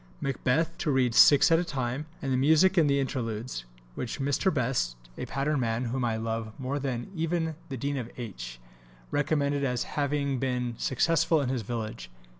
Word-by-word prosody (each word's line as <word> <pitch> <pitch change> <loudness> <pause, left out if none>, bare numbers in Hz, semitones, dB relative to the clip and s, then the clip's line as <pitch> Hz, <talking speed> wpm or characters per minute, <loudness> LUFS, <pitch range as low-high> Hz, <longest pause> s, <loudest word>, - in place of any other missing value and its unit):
Macbeth 135 +4 +1
(6) 165 - -24
to 155 - -1
read 130 -3 +2
6 145 +7 +7
at 165 - +6
a - - +1
time, 135 -2 -3 0.2
and 135 -1 0
the - - +2
music 160 +8 +5
in 165 -5 +5
the 140 0 +3
interludes, 115 - -3 0.3
which 120 - -4
Mr. 145 +7 +1
Best 125 - 0 0.2
(a - - -5
pattern 140 +2 0
man 115 0 0
whom 125 +2 -2
I 115 -2 0
love 110 +1 -4
more 130 +2 -2
even 160 +6 -2
than 160 -1 -4
the 135 - -4
Dean 140 +3 -2
of 120 -3 -4
H.) - - -7 0.5
recommended 145 -1 +1
as 125 -3 0
having 140 -2 -1
been 125 -2 -1
successful 165 +4 +2
in 135 -3 -1
his 130 -2 -1
village. 110 - -5
135 Hz, 185 wpm, -28 LUFS, 120-145 Hz, 0.5 s, 6